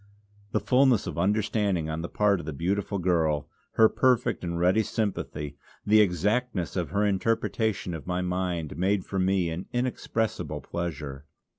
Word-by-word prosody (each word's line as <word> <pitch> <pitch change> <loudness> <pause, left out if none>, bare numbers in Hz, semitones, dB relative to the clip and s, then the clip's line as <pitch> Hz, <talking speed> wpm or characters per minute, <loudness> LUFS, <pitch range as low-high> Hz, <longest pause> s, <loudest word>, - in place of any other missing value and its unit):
The - - +1
fulness 130 -4 +3
of - - -4
understanding 100 -3 +1
on 80 +1 -3
the 85 - -5
part 105 -2 +2
of 80 - -8
the 80 - -3
beautiful 100 +7 -1
girl, 80 -5 +1 0.3
her 110 - +6
perfect 125 -3 +2
and 85 -1 -2
ready 90 +5 +4
sympathy, 90 -10 -3 0.3
the 105 +1 +6
exactness 105 - 0
of 90 -3 -1
her 100 +1 +1
interpretation 105 -1 0
of 80 0 -7
my 90 0 -1
mind, 90 -4 -2
made 95 +1 +1
for 95 - -3
me 95 -2 +2
an 85 +3 -5
inexpressible 120 -2 -2
pleasure. 75 -4 -5
95 Hz, 155 wpm, -27 LUFS, 85-105 Hz, 0.3 s, her